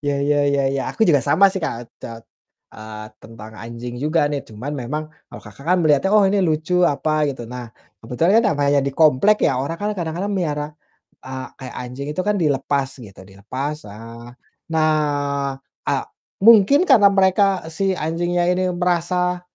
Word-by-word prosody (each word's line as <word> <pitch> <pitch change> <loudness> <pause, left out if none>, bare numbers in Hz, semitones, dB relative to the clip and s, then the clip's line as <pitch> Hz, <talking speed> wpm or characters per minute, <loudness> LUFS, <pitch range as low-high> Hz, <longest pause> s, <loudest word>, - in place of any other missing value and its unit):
Ya 145 -1 -1
ya 145 0 +3
ya 140 0 +1
ya, 135 - -1
aku 220 - +1
juga 145 -5 +4
sama 180 +8 +3
sih, 190 - -4
Kak, 160 -8 -3 0.2
tet 115 -1 -9 0.5
eee, 110 0 -9
tentang 110 -1 -12
anjing 120 +1 -7
juga 155 +3 +1
nih, 145 -1 -2
cuman 115 +7 -7
memang 140 +6 -3 0.3
kalau - - -11
Kakak 105 +5 -13
kan 180 +1 +4
melihatnya, 150 +5 +3
"Oh, 205 - +5
ini 200 +1 +1
lucu." 160 +3 0
Apa, 155 +1 0
gitu. 130 -4 -5
Nah, 125 -1 -7 0.3
kebetulan 125 +11 0
kan - - -3
namanya 145 0 +2
di - - 0
komplek 160 +8 +5
ya, - - +2
orang 145 +5 -3
kan 205 - -1
kadang-kadang 175 +4 -3
melihara, 150 -6 -2 0.6
eee, 130 0 -6
kayak 130 -2 -9
anjing 125 +3 -7
itu 155 - -2
kan 210 - +2
dilepas 140 -2 0
gitu, 105 -5 -13
dilepas, 110 +10 -5
eee, 115 +3 -11 0.5
nah, 155 -1 +3 1.0
a - - +2 0.5
mungkin 230 - +6
karena 220 -7 +7
mereka, 195 0 +3 0.3
si 190 +3 0
anjingnya 175 +3 -1
ini 180 +1 0
merasa 180 0 0
150 Hz, 170 wpm, -20 LUFS, 125-180 Hz, 1.0 s, karena